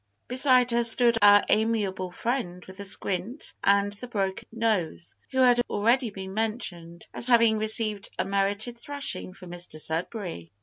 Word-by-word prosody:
Beside 255 -1 +3
her 235 0 +1
stood 235 0 +5
our 205 0 +6
amiable 210 -4 -1
friend 180 -3 -4
with 190 0 -13
the 200 - -6
squint 195 - -1
and 200 0 +2
the 225 +5 -6
broken 195 -5 -4
nose, 215 -7 -2
who 260 - -7
has 245 -1 +4
already 235 +4 +1
been 190 -2 -9
mentioned 195 -6 -3
as 235 - +3
having 230 -3 +3
received 215 -1 +2
a - - -1
merited 200 +4 -1
thrashing 285 -8 -1
from 185 -1 -13
Mr 175 -3 -4
Sudberry. 165 - -4
210 Hz, 150 wpm, -25 LUFS, 190-235 Hz, -, our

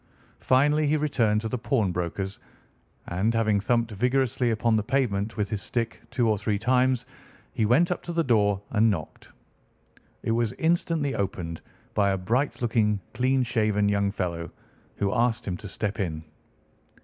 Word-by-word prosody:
Finally 145 +4 +3
he 155 +2 +2
returned 120 -8 +1
to 110 - -3
the 125 +2 -3
pawnbroker's, 95 -5 -1 0.7
and, 100 +6 0
having 110 -2 +2
thumped 115 +2 +1
vigorously 125 +3 +1
upon 115 0 +2
the 110 - +2
pavement 110 -3 -1
with 105 -1 0
his 105 -2 -2
stick 115 -2 -3
two 120 -2 +1
or 105 -2 +2
three 105 0 0
times, 125 +2 +2 0.5
he 110 -3 +1
went 165 +10 +4
up 180 - -1
to 175 - -6
the 165 -1 +1
door 105 -6 +2
and 110 0 +4
knocked. 85 -7 -5 0.9
It - - 0
was 115 -1 +1
instantly 160 -3 0
opened 90 -6 -3 0.3
by 100 -1 +2
a - - 0
bright 120 +9 -1
looking, 110 -3 +2
clean 130 +1 +2
shaven 110 -4 +1
young 100 -1 +1
fellow, 85 -4 -3 0.5
who 100 -1 0
asked 120 -1 +1
him 90 - -1
to 105 - -8
step 105 +3 -3
in. 80 -5 -2
110 Hz, 160 wpm, -26 LUFS, 100-125 Hz, 0.9 s, went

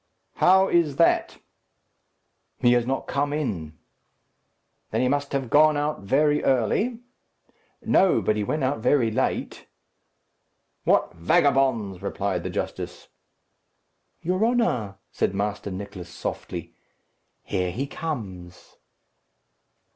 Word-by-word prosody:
"How 190 +1 +5
is 165 -5 +2
that?" 165 - +2 1.2
"He 120 - +4
has 120 -1 +1
not 135 +1 -1
come 145 +1 -1
in." 90 - -3 1.1
"Then - - 0
he 125 - +2
must 140 +1 -1
have 135 -4 -2
gone 155 0 +5
out 150 +1 -1
very 145 +9 +2
early?" 200 - +1 0.8
"No; 190 -1 +4
but 110 - +1
he 105 - -1
went 150 +7 -2
out 130 -1 0
very 125 -1 +2
late." - - -2 1.2
"What - - +2
vagabonds!" 115 - +2
replied 100 -2 -2
the - - -4
justice. - - -5 1.1
"Your 185 +4 0
honour," 225 - +1 0.2
said 95 - -1
Master 100 +1 -2
Nicless, 95 -2 -7
softly, - - -6 0.7
"here 90 -2 -1
he 125 +10 -3
comes." 105 - -7
130 Hz, 110 wpm, -25 LUFS, 100-150 Hz, 1.2 s, How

